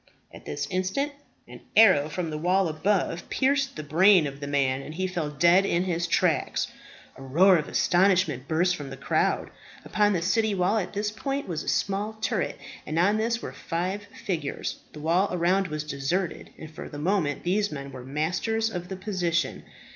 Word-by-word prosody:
At - - -13
this 145 0 -3
instant 190 +11 -1 0.4
an - - -12
arrow 185 -10 +6
from 165 0 -3
the 150 - -3
wall 185 +3 +2
above 175 +2 -1
pierced 270 0 +1
the 155 - -5
brain 175 +3 +5
of 140 -1 -6
the 140 - -5
man, 135 -2 +1
and 150 +3 -8
he 185 +2 -1
fell 175 -5 -2
dead 170 +6 +4
in 175 -2 +1
his 175 -2 -1
tracks. 165 -4 +1 0.5
A - - -12
roar 170 +9 +5
of 155 - -3
astonishment 175 -7 +2
burst 175 +3 +2
from 145 -4 -7
the 135 - -8
crowd. - - 0 0.3
Upon 210 -1 +2
the 170 -3 -1
city 220 +2 +1
wall 190 +4 +2
at 185 - -5
this 210 +1 -1
point 275 +6 -3
was 165 -4 -3
a - - -4
small 205 +2 -1
turret, 220 -2 -2 0.3
and 155 - -4
on 200 +5 +3
this 230 +1 -1
were - - -6
five 185 +4 -3 0.2
figures. 160 -7 -3
The 150 - -10
wall 175 +6 +2
around 180 +2 +2
was 155 -2 -4
deserted, 150 +5 -2
and 160 -1 -10
for 155 - -8
the 145 - -8
moment 155 -3 0
these 205 +4 +1
men 140 -2 -6
were 130 -1 -9
masters 185 - -1
of 180 -2 -5
the 190 - -5
position. 185 -4 -1
180 Hz, 190 wpm, -26 LUFS, 155-200 Hz, 0.5 s, arrow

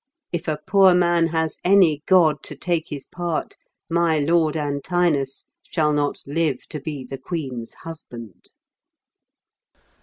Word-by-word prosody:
If 175 0 -4
a 155 -1 0
poor 190 -1 +5
man 175 -1 +3
has 160 -1 -1
any 180 -6 +4
god 160 -6 +4
to 150 - -6
take 165 +2 -1
his 140 -2 -6
part, 175 -2 -3 0.3
my 170 -1 +2
lord 160 +1 +2
Antinous 145 -1 0 0.2
shall 155 -3 0
not 145 -1 -1
live 145 -2 -1
to 150 - -5
be 145 -1 -5
the 135 +1 -7
queen's 130 -7 -5
husband." 120 - -10
160 Hz, 130 wpm, -22 LUFS, 145-170 Hz, 0.3 s, poor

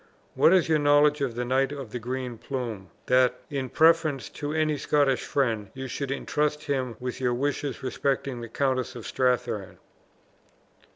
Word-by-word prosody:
What - - +5
is 185 -2 +4
your 160 -1 +3
knowledge 145 0 +4
of 130 -4 -1
the 120 0 -2
Knight 135 +2 +1
of 135 -6 -7
the 125 - -4
Green 125 0 -4
Plume, 115 -8 -5 0.2
that, 125 0 +3
in 135 -3 -2
preference 160 -4 +3
to 145 0 -5
any 155 -1 +1
Scottish 140 -2 +1
friend, 115 -7 0
you 130 0 -5
should 130 +2 -4
intrust 150 +2 -1
him 130 -4 -2
with 125 +1 -5
your 125 -1 +1
wishes 140 0 -2
respecting 135 -1 -1
the 115 - -7
Countess 130 0 -1
of 120 - -8
Strathearn?" 125 -6 -1
130 Hz, 165 wpm, -26 LUFS, 125-145 Hz, 0.2 s, What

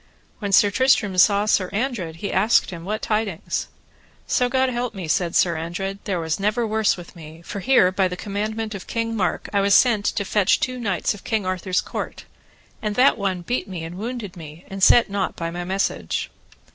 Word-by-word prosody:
When 205 -3 -3
Sir 200 +1 +5
Tristram 235 -6 +2
saw 200 +2 +5
Sir 190 -3 +2
Andred 210 -7 -2
he 200 +5 -4
asked 210 +3 +3
him 170 -2 -8
what 215 +3 -3
tidings. 210 -4 -2 0.6
So 250 -1 +1
God 260 +1 +2
me - - -4
help, 220 -9 -3
said 175 -2 0
Sir 170 -2 +3
Andred, 180 +5 -4
there 190 -3 -1
was 160 +1 -2
never 215 +4 +1
worse 220 -2 +1
with 175 +1 -11
me, 160 0 -12
for 200 - -6
here 195 -4 +4
by 185 0 +2
the 180 0 -6
commandment 215 +2 -3
of 195 -2 -8
King 230 0 -2
Mark 185 -4 -1
I 200 - +3
was 200 0 +4
sent 225 -5 +4
to 205 - 0
fetch 200 -1 +2
two 255 -1 -2
knights 200 -7 0
of 205 - -12
King 220 -4 -1
Arthur's 185 0 0
court, - - -6 0.6
and 210 -1 -2
that 255 +4 +5
one 190 -4 -2
beat 245 +6 -2
me 180 -4 -6
and 165 +2 -7
wounded 220 -1 -5
me, 160 0 -11
and 195 0 -6
set 235 +5 +6
nought 200 -2 -2
by 165 0 -4
my 175 +1 -4
message. 180 - -2
200 Hz, 205 wpm, -22 LUFS, 180-220 Hz, 0.6 s, set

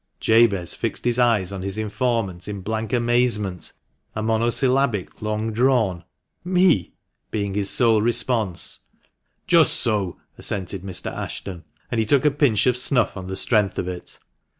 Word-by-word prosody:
Jabez 110 -6 +3
fixed - - -4
his 120 0 +1
eyes 110 -6 +2
on 100 -1 -5
his 95 +1 -4
informant 110 -4 -2
in 100 -2 -5
blank 110 +3 -3
amazement, 120 -6 +1 0.4
a 110 - -3
monosyllabic 115 0 +1
long 110 +1 -2
drawn 115 -7 +1 0.2
" - - -51
Me! 175 - +3 0.2
" - - -54
being 100 -2 -3
his 100 -1 -1
sole 115 -4 +3
response. 115 -5 +1 0.3
" - - -53 0.3
Just - - +4
so! 100 -6 -1
" - - -43
assented 95 -1 -2
Mr. 95 -2 -4
Ashton, 90 -4 -6 0.3
and 120 - 0
he 110 - 0
took 140 +3 +3
a 150 - +5
pinch 135 -7 +2
of 125 -1 +2
snuff 125 -1 +1
on 95 -1 -7
the 95 - -4
strength 105 -3 +1
of 90 - -2
it. 90 -1 -6
110 Hz, 165 wpm, -22 LUFS, 95-120 Hz, 0.4 s, a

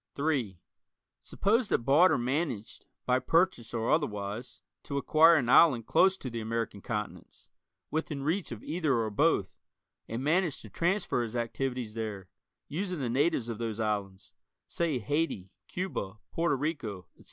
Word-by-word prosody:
(3) 135 - -1 0.6
Suppose 220 +3 +1
that 115 - 0
Barter 160 +8 +5
managed, 125 -3 -3 0.2
by 125 0 +3
purchase 165 -3 +1
or 115 -1 -1
otherwise, 105 - -2 0.2
to 140 -1 -4
acquire 160 +4 +6
an 135 -6 +1
island 125 -3 +6
close 190 +8 +4
to 130 - -6
the 115 0 -4
American 110 -2 -3
continents, 105 -1 -6 0.4
within 155 -3 -2
reach 165 +3 -1
of 115 -2 -7
either 155 -4 0
or 110 -2 0
both, 105 - +1 0.5
and 115 +3 -4
managed 160 0 +1
to 110 - -12
transfer 175 -6 0
his 115 0 -4
activities 120 -1 -2
there, 105 -5 -5 0.4
using 180 +3 -3
the 130 -4 -2
natives 135 0 +1
of 115 -2 -5
those 115 -2 -3
islands 100 -3 -3 0.3
say 165 -5 -1
Haiti, 120 - -2 0.2
Cuba, 145 - -4
Porto 165 -3 +1
Rico, 135 - -3
etc. - - -34
125 Hz, 150 wpm, -30 LUFS, 110-160 Hz, 0.6 s, acquire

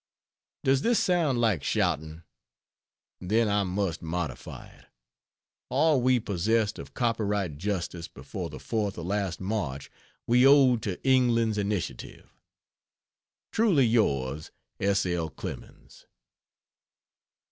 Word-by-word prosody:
Does 135 0 +3
this 235 -1 +2
sound 165 -9 +2
like 110 -11 +1
shouting? 80 +4 -1 1.0
Then 110 +5 +1
I 105 0 +2
must 95 -2 -2
modify 80 -4 -5
it: - - -19 0.8
all 145 0 +3
we 130 0 +3
possessed 105 +2 0
of - - -10
copyright 105 - -1
justice 90 -3 -3
before 65 +2 -7
the - - -8
fourth 105 -4 -2
of 85 - -5
last 95 -3 -2
March 95 -9 -3 0.3
we 125 +2 +4
owed 135 -4 +6
to 100 -4 -4
England's 115 -4 +3
initiative. 100 -10 -4 1.2
Truly 195 - +3
Yours, 75 - 0 0.3
S. 100 0 +1
L. 85 -3 -1
CLEMENS. 70 - -10
105 Hz, 110 wpm, -27 LUFS, 85-120 Hz, 1.2 s, owed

